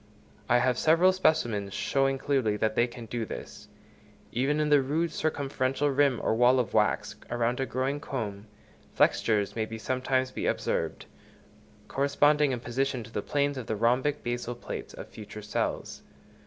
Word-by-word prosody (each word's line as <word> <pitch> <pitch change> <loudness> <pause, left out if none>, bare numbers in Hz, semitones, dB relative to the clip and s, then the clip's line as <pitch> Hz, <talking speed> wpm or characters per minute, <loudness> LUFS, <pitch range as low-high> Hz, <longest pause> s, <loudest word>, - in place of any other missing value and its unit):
I 120 - +5
have 125 0 +2
several 170 +4 +5
specimens 120 - +1
showing 135 0 +1
clearly 135 -6 0
that 110 0 0
they 120 +2 +2
can 120 -1 -9
do 115 +1 -3
this. 105 -1 -8 0.6
Even 135 +5 +1
in 150 0 +1
the 145 -2 +6
rude 155 +5 0
circumferential 140 -2 -1
rim 140 -3 +3
or - - +2
wall 125 +3 +5
of 120 -5 -2
wax - - +1
round 120 +1 0
a 135 - -1
growing 130 +3 -1
comb, 110 -8 -5 0.5
flexures 105 -3 +2
may 115 0 -3
sometimes 130 +2 -1
be - - -3
observed, - - -1 0.8
corresponding 145 +1 +3
in 125 -2 -3
position 130 0 -1
to 115 - -13
the - - -2
planes 140 -1 0
of 120 - -7
the 110 - -1
rhombic 125 +7 +1
basal 120 0 -3
plates 120 - -7
of - - -8
future 105 0 -10
cells. 105 - -3
130 Hz, 160 wpm, -28 LUFS, 115-140 Hz, 0.8 s, the